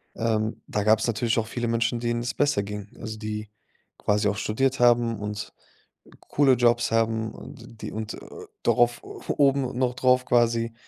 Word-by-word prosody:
Ähm, 110 Hz, -1 st, -1 dB
da 105 Hz, -, -1 dB
gab's 110 Hz, +2 st, +3 dB
natürlich 115 Hz, 0 st, +1 dB
auch 110 Hz, -, -3 dB
viele 120 Hz, +1 st, -3 dB
Menschen, 115 Hz, +1 st, 0 dB
denen 120 Hz, 0 st, -1 dB
es 120 Hz, -, -3 dB
besser 145 Hz, -8 st, +2 dB
ging, 105 Hz, 0 st, -6 dB
also 110 Hz, -1 st, -6 dB
die 105 Hz, -1 st, -5 dB, 0.5 s
quasi 105 Hz, 0 st, +1 dB
auch 100 Hz, -, -2 dB
studiert 130 Hz, +7 st, 0 dB
haben 120 Hz, -2 st, +3 dB
und 105 Hz, 0 st, -5 dB, 0.7 s
coole 140 Hz, -2 st, +3 dB
Jobs 120 Hz, -1 st, +2 dB
haben 115 Hz, -1 st, +1 dB
und 115 Hz, -3 st, -12 dB
die -, -, -5 dB
und, 110 Hz, 0 st, -5 dB
äh, -, -, -10 dB, 0.4 s
darauf 120 Hz, 0 st, +3 dB
oben 135 Hz, -3 st, 0 dB
noch 125 Hz, -1 st, 0 dB
drauf 125 Hz, 0 st, +3 dB
quasi: 115 Hz, -1 st, +2 dB
115 Hz, 165 wpm, -25 LUFS, 110-120 Hz, 0.7 s, gab's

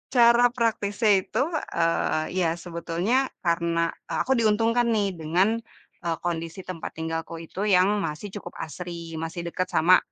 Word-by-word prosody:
cara 235 Hz, 0 st, +7 dB
praktisnya 220 Hz, -2 st, +1 dB
itu, 225 Hz, -, -1 dB, 0.3 s
eee, 165 Hz, -1 st, +1 dB
iya 175 Hz, -3 st, +3 dB, 0.2 s
sebetulnya 170 Hz, +6 st, -1 dB, 0.3 s
karena 170 Hz, 0 st, +1 dB, 0.2 s
aku 265 Hz, -, -1 dB
diuntungkan 230 Hz, +2 st, +3 dB
nih, 205 Hz, -2 st, +2 dB
dengan 175 Hz, +6 st, +2 dB, 0.6 s
e -, -, -1 dB, 0.2 s
kondisi 165 Hz, +1 st, -3 dB
tempat 180 Hz, -3 st, -6 dB
tinggalku 165 Hz, +1 st, -3 dB
itu 175 Hz, +4 st, -7 dB
yang 185 Hz, -2 st, +5 dB, 0.2 s
masih 155 Hz, +7 st, -5 dB
cukup 175 Hz, -, -9 dB
asri, 170 Hz, 0 st, -7 dB
masih 165 Hz, +1 st, -4 dB
deket 185 Hz, +2 st, -1 dB
sama 180 Hz, +3 st, +6 dB
175 Hz, 135 wpm, -26 LUFS, 165-210 Hz, 0.6 s, cara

